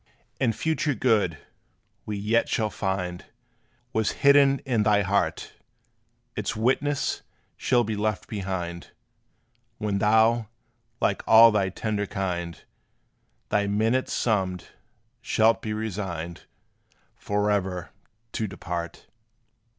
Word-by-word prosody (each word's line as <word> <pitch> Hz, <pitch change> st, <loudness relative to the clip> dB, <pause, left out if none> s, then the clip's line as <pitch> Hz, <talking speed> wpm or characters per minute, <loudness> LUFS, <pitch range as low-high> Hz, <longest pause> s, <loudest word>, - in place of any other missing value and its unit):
And 115 Hz, -4 st, +1 dB
future 155 Hz, -3 st, 0 dB
good, 105 Hz, -11 st, +2 dB, 0.7 s
we 105 Hz, -1 st, -3 dB
yet 110 Hz, +3 st, +1 dB
shall 110 Hz, -2 st, 0 dB
find, 90 Hz, -2 st, -3 dB, 0.7 s
Was 110 Hz, -1 st, +1 dB
hidden 140 Hz, -1 st, +6 dB
in 120 Hz, -5 st, +1 dB
thy 105 Hz, -1 st, +3 dB
heart; 95 Hz, -5 st, -1 dB, 0.8 s
Its -, -, -2 dB
witness 135 Hz, +5 st, 0 dB, 0.3 s
shall 120 Hz, -2 st, +2 dB
be 110 Hz, -1 st, -3 dB
left 105 Hz, -1 st, -2 dB
behind, 90 Hz, -4 st, -5 dB, 0.8 s
When 105 Hz, -2 st, -1 dB
thou 110 Hz, +2 st, +3 dB, 0.5 s
like -, -, +1 dB
all 115 Hz, +1 st, +9 dB
thy 100 Hz, -3 st, +1 dB
tender 105 Hz, +1 st, -2 dB
kind, 90 Hz, -5 st, -3 dB, 0.9 s
Thy 105 Hz, -1 st, +1 dB
minutes 110 Hz, +5 st, +1 dB
summed, 95 Hz, -6 st, -1 dB, 0.5 s
shalt 115 Hz, -1 st, +2 dB
be 110 Hz, -, -4 dB
resigned 95 Hz, -6 st, -4 dB, 0.7 s
Forever 100 Hz, -3 st, -1 dB, 0.4 s
to 110 Hz, -, -2 dB
depart. 85 Hz, -2 st, -6 dB
105 Hz, 105 wpm, -26 LUFS, 95-115 Hz, 0.9 s, all